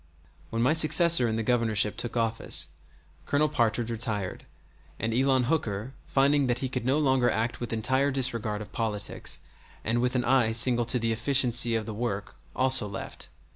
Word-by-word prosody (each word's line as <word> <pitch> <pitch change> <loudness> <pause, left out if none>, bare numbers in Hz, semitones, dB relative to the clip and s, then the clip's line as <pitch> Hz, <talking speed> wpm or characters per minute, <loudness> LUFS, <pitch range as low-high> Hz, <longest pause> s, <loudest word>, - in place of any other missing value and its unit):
When 115 +1 -1
my 130 - +3
successor 160 -3 +5
in 110 - -2
the 115 - -2
Governorship 110 -3 +1
took 120 0 -4
office, 115 0 0 0.6
Colonel 150 +2 +2
Partridge 115 -4 0
retired, 110 -4 -4 0.5
and 115 0 -2
Elon 130 +1 +2
Hooker, 120 -4 -2
finding 140 0 +2
that 120 -1 0
he 130 +1 -4
could 125 -2 -4
no 135 +3 +2
longer 130 -4 +2
act 115 +2 -2
with 120 - -5
entire 130 +5 +1
disregard 115 -6 -1
of - - -15
politics 105 -3 -4 0.4
and 115 +2 0
with 125 +1 0
an 125 -1 0
eye 120 -3 +2
single 120 +1 +4
to 120 +2 +1
the 115 -1 -1
efficiency 120 0 +3
of 110 -1 -2
the 110 - -6
work, 105 -2 -4 0.2
also 130 -4 +2
left. 100 - -7
120 Hz, 175 wpm, -27 LUFS, 110-130 Hz, 0.6 s, successor